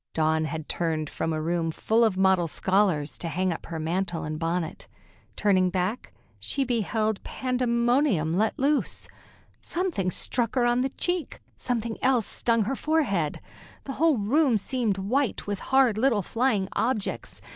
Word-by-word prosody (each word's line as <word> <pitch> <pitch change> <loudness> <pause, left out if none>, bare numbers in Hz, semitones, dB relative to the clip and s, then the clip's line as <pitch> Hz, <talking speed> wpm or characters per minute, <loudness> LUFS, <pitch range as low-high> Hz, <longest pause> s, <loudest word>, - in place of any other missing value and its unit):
Dawn 160 0 +2
had 155 0 -5
turned 160 -3 -2
from 165 - -2
a 155 - -1
room 165 +1 -1
full 220 +8 +1
of 215 -5 +2
model 190 -2 +3
scholars, 185 -4 +1
to 170 - -2
hang 180 +2 0
up - - -9
her 165 - -5
mantle 175 +1 -2
and 155 0 -4
bonnet. 165 +1 -3 0.5
Turning 185 -3 +3
back, 185 +6 -2 0.3
she 275 - -1
beheld 220 -3 -1
pandemonium 245 - +1
let 215 +4 +1
loose. 285 +2 0 0.5
Something 340 - -1
struck 235 +6 0
her 245 -2 +3
on 240 +1 +2
the 265 - 0
cheek, 355 +4 -3 0.2
something 230 -2 -3
else 255 -4 +3
stung 230 -2 +1
her 255 +7 -2
forehead. 250 - 0 0.4
The 270 - -5
whole 325 -5 +4
room 245 +4 +2
seemed 220 -2 -1
white 240 +7 -1
with 205 -2 -3
hard 260 -5 +4
little 230 -5 +2
flying 225 -3 0
objects. 225 -4 -2
210 Hz, 155 wpm, -26 LUFS, 175-250 Hz, 0.5 s, whole